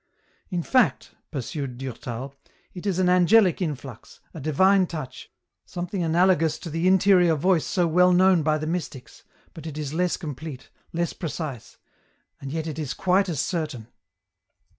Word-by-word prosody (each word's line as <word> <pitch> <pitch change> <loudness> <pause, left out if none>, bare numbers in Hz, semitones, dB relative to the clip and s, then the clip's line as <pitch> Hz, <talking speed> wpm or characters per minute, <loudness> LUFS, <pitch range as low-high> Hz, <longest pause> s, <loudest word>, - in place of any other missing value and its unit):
" - - -39
In 170 - -1
fact," 255 +3 +2 0.2
pursued 135 -2 -5
Durtal, 130 0 -6 0.2
" - - -37
it 185 +2 -7
is 190 -3 0
an 185 -1 +2
angelic 180 +2 +4
influx, 135 -7 -6
a 160 - -8
divine 185 +6 +3
touch, 155 -6 -7 0.3
something 180 +2 -5
analogous 165 -1 +2
to 165 - -8
the 165 +3 0
interior 185 -3 +5
voice 170 +2 +1
so 180 -2 +1
well 180 +2 +4
known 185 -1 +4
by 155 0 +1
the 155 - -4
mystics, 155 -8 -5 0.3
but 160 -1 -9
it 150 -1 -7
is 150 -1 -4
less 180 +1 0
complete, 150 -4 -8 0.2
less 170 0 -2
precise, 155 - -6 0.7
^nd 135 - -5
yet 160 0 -3
it 160 -1 -5
is 145 -4 -4
quite 190 +1 +2
as 155 -6 -2
certain." 150 - -4
165 Hz, 160 wpm, -24 LUFS, 145-180 Hz, 0.7 s, interior